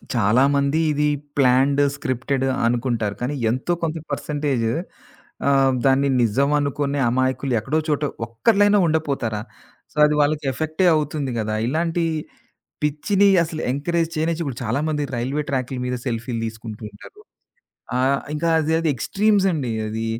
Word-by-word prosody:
చాలామంది 140 +7 +3
ఇది 150 0 +1 0.3
planned, 135 +1 +3
scripted 135 -1 -2 0.2
అనుకుంటారు. 120 -4 0
కానీ 130 +4 -2 0.2
ఎంతో 130 +9 -1
కొంత 160 0 -1
పర్సెంటేజు 140 -6 -1 0.8
ఆహ్, 135 -1 +4
దాన్ని 135 +1 +3
నిజం 135 +6 +2
అనుకునే 145 0 -1
అమాయకులు 130 +1 0
ఎక్కడో 150 +7 -1
చోటో 150 -1 +1 0.2
ఒక్కలైనా 205 - +3
ఉండపోతారా? 140 -9 -1 0.5
సో - - -28
అది 150 - +1
వాళ్ళకి 145 0 +1
ఎఫెక్టే 160 +6 0
అవుతుంది 150 -3 -1
గదా! 110 0 -2
ఇలాంటి 165 +4 0 0.8
పిచ్చిని 190 +7 +2 0.2
అసలు 160 -1 -6
ఎంకరేజ్ 165 +4 -1
చేయనిచ్చి 165 +1 0
ఇప్పుడు 130 -4 -5
చాలామంది 150 +6 -1
రైల్వే 135 +5 -1
ట్రాకుల 130 -1 -2
మీద 125 0 -2
సెల్ఫీలు 115 0 -3
తీసుకుంటూ 110 0 -8
ఉంటారు. 250 - -15 0.8
ఆహ్, 135 +2 +2
ఇంకా 165 +2 -1
అది 160 +1 0
అది 160 -2 +1
ఎక్స్‌ట్రీమ్స్ 200 - +1
అండి 130 -7 -2 0.2
అది. 115 +1 -3
140 Hz, 130 wpm, -22 LUFS, 125-155 Hz, 0.8 s, ఆహ్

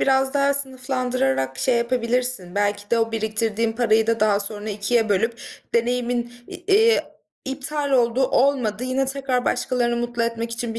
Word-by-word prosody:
biraz 265 +1 +2
daha 280 0 +3
sınıflandırarak 255 - -1
şey 250 -2 +2
yapabilirsin. 235 -5 0
Belki 205 0 -1
de 235 - +3
o 225 0 0
biriktirdiğin 220 0 -1
parayı 225 -1 +2
da 230 -1 0
daha 205 -2 +3
sonra 210 +1 -3
2'ye 215 +2 0
bölüp 225 +4 0 0.3
deneyimin, 240 0 0 0.2
i - - -7
eee, 440 +3 +3 0.4
iptal 285 +2 -3
oldu 250 -1 +2
olmadı 250 -4 +1
yine 260 +1 0
tekrar 270 -2 -1
başkalarını 245 -1 0
mutlu 240 0 -2
etmek 230 0 -2
için 230 -1 -3
bir - - -4
235 Hz, 155 wpm, -22 LUFS, 220-255 Hz, 0.4 s, daha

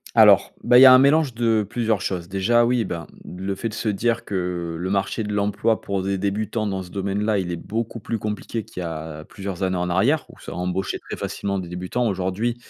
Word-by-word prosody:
Alors, - - +6
bah, 125 - +6
il - - +9
y - - +11
a 130 - +10
un 130 - +9
mélange 140 -1 +4
de 115 -3 +1
plusieurs 110 -4 0
choses. 90 -1 -3
Déjà 100 +5 +3
oui, 120 -2 +2
ben, 85 -2 -5 0.2
le 95 +2 -4
fait 115 +4 -3
de 110 - -8
se 115 - -2
dire 115 +3 0
que 90 -3 -3
le 90 +2 -3
marché 100 +3 0
de 105 -1 -4
l'emploi 105 +2 +1
pour 100 -1 -2
des 100 0 -1
débutants 105 +3 -1
dans 95 -2 -2
ce 90 - -12
domaine 100 +1 -2
là, 105 -2 +2
il 90 -2 -2
est - - -2
beaucoup 115 +6 -4
plus 115 +2 -3
compliqué 105 +1 -4
qu'il 90 - -8
y - - -3
a 80 -1 -6
plusieurs 95 -2 -6
années 95 -1 +1
en 90 0 -1
arrière, 125 - +2
où - - -15
ça - - -8
embauché 90 +2 -2
très - - -8
facilement 100 -1 -3
des 90 -2 -5
débutants. 90 +7 -2
Aujourd'hui, 95 +5 -1
100 Hz, 235 wpm, -23 LUFS, 90-115 Hz, 0.2 s, y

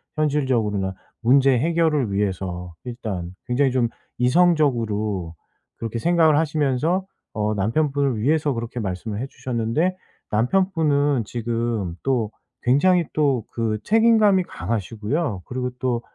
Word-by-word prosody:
현실적으로나 125 -11 0 0.3
문제 135 +3 +5
해결을 155 -4 +1
위해서 95 -3 -2
일단 105 -8 -5
굉장히 130 +2 +2
좀 125 -2 +2 0.3
이성적으로 120 - +1 0.4
그렇게 115 0 -4
생각을 160 +1 +4
하시면서 155 +3 +1 0.3
어 105 0 0
남편분을 135 +4 0
위해서 150 +4 +2
그렇게 115 0 -5
말씀을 100 +1 -4
해 135 - -3
주셨는데 130 +9 -1 0.4
남편분은 145 - +2
지금 115 -5 -2
또 120 -6 0 0.3
굉장히 170 +8 +3
또 140 -7 +1
그 115 -2 -1
책임감이 220 -3 +4
강하시고요. 115 - -3
그리고 125 0 -3
또 125 -2 0
125 Hz, 295 characters per minute, -23 LUFS, 110-150 Hz, 0.4 s, 문제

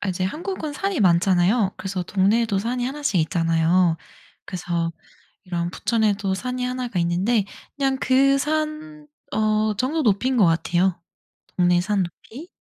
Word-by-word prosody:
아 205 - -3
이제 185 0 -2
한국은 310 - -4
산이 390 +3 -2
많잖아요. 185 +3 +3
그래서 185 -1 -4
동네에도 205 +3 +1
산이 245 +4 -2
1 285 +4 -4
씩 215 -10 +1
있잖아요. 165 +1 +2 0.5
그래서 170 -2 -3 0.5
이런 175 -2 -3
부천에도 210 -2 0
산이 250 +4 -3
1 250 0 -3
가 195 -6 -3
있는데 190 +6 +1 0.3
그냥 270 -2 0
그 275 +1 +4
산 305 +1 -3 0.2
어 215 0 +1
정도 285 +9 0
높이인 250 +3 +1
것 215 - +5
같아요 175 +2 +1 0.6
동네 175 -1 +3
산 200 -1 0
높이. 250 - -11
210 Hz, 285 characters per minute, -23 LUFS, 180-255 Hz, 0.6 s, 것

